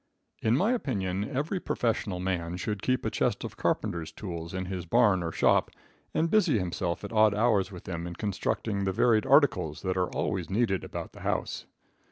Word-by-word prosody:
In 110 Hz, +3 st, +3 dB
my 205 Hz, +8 st, +2 dB
opinion 100 Hz, -, -1 dB
every 150 Hz, +7 st, -1 dB
professional 110 Hz, -, -1 dB
man 90 Hz, -2 st, -2 dB
should 105 Hz, +1 st, -3 dB
keep 130 Hz, 0 st, 0 dB
a -, -, 0 dB
chest -, -, 0 dB
of -, -, -6 dB
carpenters' 85 Hz, -2 st, -1 dB
tools 85 Hz, -4 st, -6 dB
in 95 Hz, 0 st, -3 dB
his 90 Hz, -2 st, -5 dB
barn 105 Hz, -4 st, +4 dB
or 85 Hz, -1 st, -2 dB
shop, -, -, +3 dB, 0.4 s
and 165 Hz, -, +1 dB
busy 195 Hz, -, +4 dB
himself 90 Hz, -1 st, -2 dB
at 100 Hz, -, -6 dB
odd 110 Hz, -1 st, +5 dB
hours 105 Hz, -4 st, +2 dB
with 90 Hz, -3 st, -9 dB
them 85 Hz, -1 st, -4 dB
in 85 Hz, -, -6 dB
constructing 100 Hz, +1 st, -2 dB
the 95 Hz, -, 0 dB
varied 115 Hz, +3 st, +3 dB
articles 125 Hz, -, +3 dB
that 95 Hz, -1 st, -1 dB
are 90 Hz, -1 st, +1 dB
always -, -, -2 dB
needed 100 Hz, -2 st, +1 dB
about -, -, -6 dB
the -, -, -12 dB
house. -, -, -2 dB
100 Hz, 190 wpm, -28 LUFS, 90-115 Hz, 0.4 s, odd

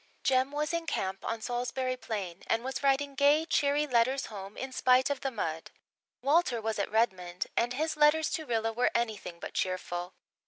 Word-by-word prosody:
Jem 260 Hz, 0 st, +3 dB
was 300 Hz, +2 st, -1 dB
in 335 Hz, -1 st, -2 dB
camp 190 Hz, -8 st, -2 dB
on 225 Hz, -1 st, -3 dB
Salisbury 250 Hz, +2 st, -2 dB
Plain 195 Hz, -8 st, -5 dB
and 225 Hz, +1 st, +1 dB
was 265 Hz, +1 st, -3 dB
writing 280 Hz, 0 st, +2 dB
gay, 285 Hz, +3 st, +4 dB
cheery 290 Hz, -2 st, +2 dB
letters 260 Hz, 0 st, +2 dB
home 195 Hz, 0 st, -8 dB
in 265 Hz, 0 st, -5 dB
spite 255 Hz, +1 st, +3 dB
of 280 Hz, -, -2 dB
the 270 Hz, -, -1 dB
mud. 165 Hz, -9 st, -4 dB, 0.5 s
Walter 280 Hz, -4 st, +3 dB
was 220 Hz, -1 st, -2 dB
at 200 Hz, -, -1 dB
Redmond 185 Hz, -6 st, 0 dB
and 240 Hz, +1 st, +1 dB
his 315 Hz, +5 st, -1 dB
letters 305 Hz, +1 st, +4 dB
to 315 Hz, -3 st, -3 dB
Rilla 225 Hz, -1 st, 0 dB
were 245 Hz, +2 st, +2 dB
anything 215 Hz, -7 st, -2 dB
but -, -, -7 dB
cheerful. 180 Hz, -1 st, -3 dB
250 Hz, 185 wpm, -30 LUFS, 215-280 Hz, 0.5 s, gay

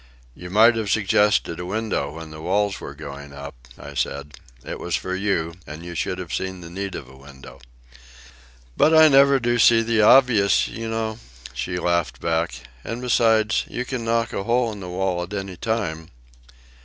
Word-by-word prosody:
"You 90 Hz, +6 st, -10 dB
might 110 Hz, +5 st, +5 dB
have 110 Hz, -3 st, -2 dB
suggested 105 Hz, -4 st, +2 dB
a 90 Hz, -, -5 dB
window 100 Hz, -8 st, -2 dB
when 80 Hz, -1 st, -9 dB
the 75 Hz, 0 st, -9 dB
walls 100 Hz, +3 st, 0 dB
were 70 Hz, -, -8 dB
going 70 Hz, -1 st, -9 dB
up," 70 Hz, 0 st, -8 dB, 0.2 s
I -, -, -10 dB
said. 70 Hz, +1 st, -3 dB, 0.3 s
"It -, -, -6 dB
was -, -, -2 dB
for 95 Hz, -, -3 dB
you, 95 Hz, -4 st, -1 dB
and 75 Hz, +4 st, -9 dB
you 85 Hz, -, -7 dB
should 90 Hz, +2 st, -2 dB
have 90 Hz, -3 st, -7 dB
seen 95 Hz, -1 st, -3 dB
the 85 Hz, -1 st, -10 dB
need 95 Hz, +2 st, -5 dB
of 65 Hz, -, -7 dB
a 65 Hz, -, -15 dB
window." 70 Hz, -1 st, -14 dB, 1.1 s
"But 160 Hz, +1 st, +4 dB
I 160 Hz, 0 st, +8 dB
never 140 Hz, 0 st, +5 dB
do 120 Hz, 0 st, 0 dB
see 115 Hz, 0 st, +6 dB
the 115 Hz, -1 st, +1 dB
obvious, 110 Hz, -3 st, +5 dB
you 115 Hz, 0 st, -6 dB
know," 110 Hz, 0 st, -3 dB, 0.3 s
she 90 Hz, +9 st, -3 dB
laughed 85 Hz, -9 st, -1 dB
back. 80 Hz, -5 st, -1 dB, 0.2 s
"And 115 Hz, -, -5 dB
besides, 115 Hz, -2 st, +2 dB
you 125 Hz, -, -4 dB
can 125 Hz, -2 st, -4 dB
knock 115 Hz, 0 st, 0 dB
a 95 Hz, -, -3 dB
hole 120 Hz, 0 st, +1 dB
in 105 Hz, -, -8 dB
the 90 Hz, -2 st, -7 dB
wall 90 Hz, -1 st, -1 dB
at 90 Hz, +3 st, -7 dB
any 95 Hz, -2 st, -5 dB
time." 90 Hz, -6 st, -3 dB
95 Hz, 190 wpm, -22 LUFS, 80-115 Hz, 1.1 s, I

